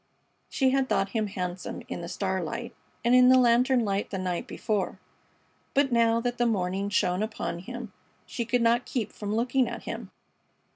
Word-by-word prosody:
She 265 -2 +2
had 270 0 +1
thought 195 0 +1
him 215 0 -1
handsome 180 -2 -5
in - - -5
the 170 - -6
starlight 190 +6 -3 0.3
and 240 - +4
in 250 0 +7
the 260 - +7
lantern 245 0 +4
light 200 0 -1
the 195 - -3
night 180 -2 -2
before, 210 -3 -2 0.8
but 275 -1 +3
now 230 -1 +4
that 245 0 -2
the 240 - +3
morning 195 -2 0
shone 185 -2 +1
upon 210 -5 -3
him 235 +2 -8 0.3
she 235 - -3
could 240 +1 +1
not 235 +1 +3
keep 220 -5 -2
from 210 0 -3
looking 245 +2 +2
at 235 0 -6
him. - - -6
230 Hz, 180 wpm, -27 LUFS, 195-245 Hz, 0.8 s, in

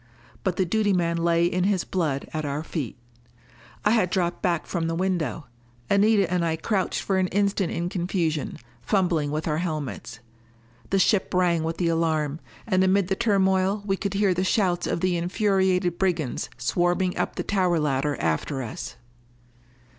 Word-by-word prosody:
But 185 -3 0
the 190 - +1
duty 205 +3 +1
man 170 -2 +1
lay 170 0 +2
in 180 +1 +1
his 195 -3 +1
blood 155 -7 -2
at 155 0 -2
our 145 +1 -3
feet. 150 -8 -4 0.9
I 210 - +5
had 220 -6 +3
dropped 175 -2 -1
back 175 -3 0
from 165 -3 -2
the 165 - -1
window. 170 -5 -1 0.5
Anita 200 -1 +4
and 180 -1 +1
I 165 -1 +1
crouched 190 +4 -1
for 190 -1 +1
an 185 - +2
instant 200 -1 0
in 170 - -2
confusion, 170 -4 -1 0.2
fumbling 175 - +1
with 155 +2 -3
our 155 0 0
helmets. 155 -9 -4 0.7
The 195 - +2
ship 195 +1 +2
rang 175 -2 +3
with 165 +1 -2
the 175 -2 +1
alarm. 160 -2 0 0.3
And 185 -4 +2
amid 190 0 +2
the 195 - +1
turmoil 195 -2 +2
we 195 -1 +1
could 200 0 -3
hear 200 -2 +3
the 180 +1 0
shouts 185 -2 +1
of - - -1
the 185 -1 +1
infuriated 185 -1 +1
brigands 170 -8 -1
swarming 175 +1 +1
up - - -2
the - - -2
tower 185 -4 +1
ladder 145 -1 0
after 80 - -1
us! 110 - -6
180 Hz, 170 wpm, -25 LUFS, 165-190 Hz, 0.9 s, I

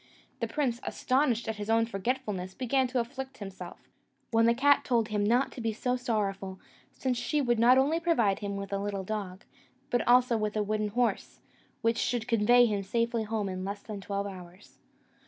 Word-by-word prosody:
The - - -1
prince, 260 -6 -1
astonished 255 -3 0
at 220 -1 -3
his 210 +1 -5
own 225 0 +4
forgetfulness, 205 -4 -3
began 260 +1 +1
to 250 0 -1
afflict 265 +2 -5
himself; 190 -3 -8 0.5
when 225 0 +4
the 235 - +4
cat 285 +3 +4
told 235 -3 +1
him 210 -1 0
not 240 +6 +2
to 245 - -8
be 225 -1 -1
so 250 +3 -1
sorrowful, 200 -6 -2 0.3
since 255 -2 -2
she 295 +5 0
would 240 -4 +1
not 245 +3 +6
only 290 +5 +3
provide 240 - +2
him 200 -1 -4
with 200 0 -6
a 200 - 0
little 200 -1 -3
dog, 195 -2 -5 0.5
but 245 - +2
also 245 -1 +5
with 215 0 -2
a 210 - +2
wooden 215 +1 -1
horse, 235 +3 -1 0.4
which 230 0 +2
should 240 -2 -1
convey 240 +2 +5
him 210 -3 0
safely 230 +4 0
home 215 -1 -2
in 185 -1 -4
less 200 +1 -5
than 210 -3 -7
twelve 200 +1 -3
hours. 185 -1 -11
225 Hz, 195 wpm, -29 LUFS, 200-245 Hz, 0.5 s, not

